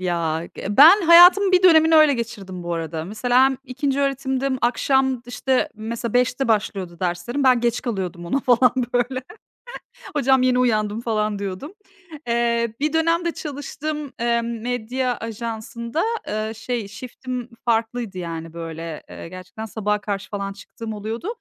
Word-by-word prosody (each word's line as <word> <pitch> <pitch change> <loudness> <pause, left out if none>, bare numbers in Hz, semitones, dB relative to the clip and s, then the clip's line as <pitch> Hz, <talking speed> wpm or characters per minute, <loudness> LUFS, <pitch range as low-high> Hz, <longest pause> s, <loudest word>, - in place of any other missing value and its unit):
ya. 170 -3 -1
Eee, 205 +1 -4
ben 340 +8 +9
hayatımın 355 +3 +7
bir 365 - +5
dönemini 320 -3 +6
öyle 310 -2 +6
geçirdim 200 -6 -6
bu 175 0 -3
arada. 160 -1 -4
Mesela 245 +6 +2
hem 265 -1 +1
ikinci 275 +1 -2
öğretimdim, 270 -1 -1
akşam, 265 +2 +2
d 235 - -15
işte, 255 +1 0
mesela 225 +1 -5
5’te 250 +1 +1
başlıyordu 195 -5 -1
derslerim, 185 +10 -2
ben 255 -2 +5
geç 240 0 0
kalıyordum 185 -7 -4
ona 275 +11 0
falan, 250 -1 +4 0.2
böyle. 250 +1 0 0.9
Hocam, 265 -2 +3
yeni 255 -1 +3
uyandım, 215 -3 +1
falan 215 -3 -1
diyordum. 200 - -5 0.6
Eee, 235 -1 +1
bir 300 +2 0
dönem 330 +2 +2
de 340 - +1
çalıştığım, 295 -1 -5
eee, 235 0 +1
medya 245 +2 -2
ajansında, 230 +4 -4 0.3
ııı, 215 +1 -3
şey, 230 -1 -4
shift'im 250 +3 -7 0.2
farklıydı, 225 -3 -1
yani, 165 -2 -6
böyle, 165 -1 -7
eee, - - -9
gerçekten 185 +4 -8
sabaha 210 -1 -2
karşı 200 -2 -4
falan 200 -1 -4
çıktığım 220 +3 -8
oluyordu. 220 - -5
235 Hz, 150 wpm, -22 LUFS, 205-265 Hz, 0.9 s, ben